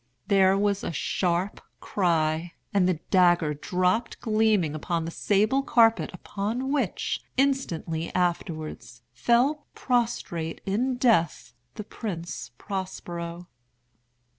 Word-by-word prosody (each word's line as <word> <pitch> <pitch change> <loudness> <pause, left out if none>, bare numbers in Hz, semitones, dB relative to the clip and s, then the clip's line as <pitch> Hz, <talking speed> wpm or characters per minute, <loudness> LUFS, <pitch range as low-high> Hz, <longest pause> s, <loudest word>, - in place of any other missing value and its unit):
There 195 -1 +5
was 200 0 +1
a - - -2
sharp 175 +4 -1 0.2
cry—and 170 +1 0
the 185 - +2 0.2
dagger 175 -5 +4
dropped 185 +8 0
gleaming 215 -8 +2
upon 165 +2 -2
the 165 - -4
sable 215 +9 +2
carpet, 230 -4 +4
upon 230 +7 -3
which, 265 -10 -1 0.2
instantly 170 -12 0
afterwards, 155 -8 -2
fell 260 - +2
prostrate 225 -10 -1
in 240 +7 0
death 215 - +2 0.2
the 210 - -5
Prince 170 - -6
Prospero. 175 -3 -5
190 Hz, 100 wpm, -26 LUFS, 170-225 Hz, 0.2 s, There